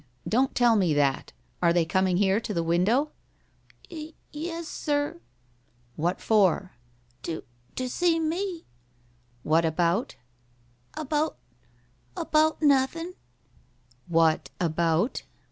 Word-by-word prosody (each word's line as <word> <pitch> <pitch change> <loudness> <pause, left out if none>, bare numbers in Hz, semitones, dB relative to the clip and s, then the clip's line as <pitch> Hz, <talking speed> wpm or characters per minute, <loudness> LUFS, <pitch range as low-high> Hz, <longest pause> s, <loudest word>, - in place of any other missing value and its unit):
Don't 260 +4 +1
tell 240 -2 +4
me 180 -7 +2
that. 140 -2 +1 0.3
Are 170 -1 +4
they 170 -1 +2
coming 185 +1 +1
here 195 +1 +3
to 215 -3 -5
the 170 - +1
window?" 205 - +2 0.8
"Y 315 -1 -7 0.2
e 310 +4 -4
s, 335 -1 -5
sir." 290 - -2 0.8
"What 175 +4 -1
for?" 195 -3 +2 0.5
"To 165 -2 -5 0.3
to 255 - -2
see 330 +5 +1
me." 340 +2 -2 0.8
"What 160 +2 +3
about?" 170 +7 0 0.8
"About 305 +1 -1 0.8
about 310 0 +2
nothin'." 295 +5 +2 0.9
"What 165 -2 +2
about?" 170 - +1
220 Hz, 110 wpm, -27 LUFS, -, 0.9 s, tell